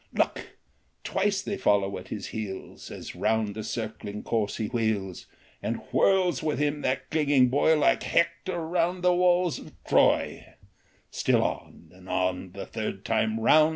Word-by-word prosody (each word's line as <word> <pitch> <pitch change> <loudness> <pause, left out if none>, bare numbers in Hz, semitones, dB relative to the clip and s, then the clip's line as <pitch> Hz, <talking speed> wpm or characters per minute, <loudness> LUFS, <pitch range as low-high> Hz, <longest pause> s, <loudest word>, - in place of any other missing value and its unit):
Look! - - -1 0.5
twice 195 0 0
they 200 0 -3
follow 100 -1 +2
at 90 - -12
his 105 - -5
heels, 105 -4 -6
As - - -8
round 110 -1 0
the 110 +1 -5
circling 105 -2 -5
course 110 -3 -1
he 110 - -1
wheels, 105 -5 -2 0.3
And - - -1 0.2
whirls 185 -7 +3
with 155 -2 -1
him 145 0 0
that 130 +1 -1
clinging 145 -5 +4
boy 145 +4 +3
Like 150 - +3
Hector 170 0 0
round 175 +2 0
the 180 0 +5
walls 180 -1 +2
of - - -12
Troy; - - +2 0.6
Still - - +2
on, - - -5
and - - -15
on, 90 0 -1
the 100 - -6
third 105 -3 -5
time 110 0 +1
round 155 +7 +5
130 Hz, 155 wpm, -27 LUFS, 105-170 Hz, 0.6 s, the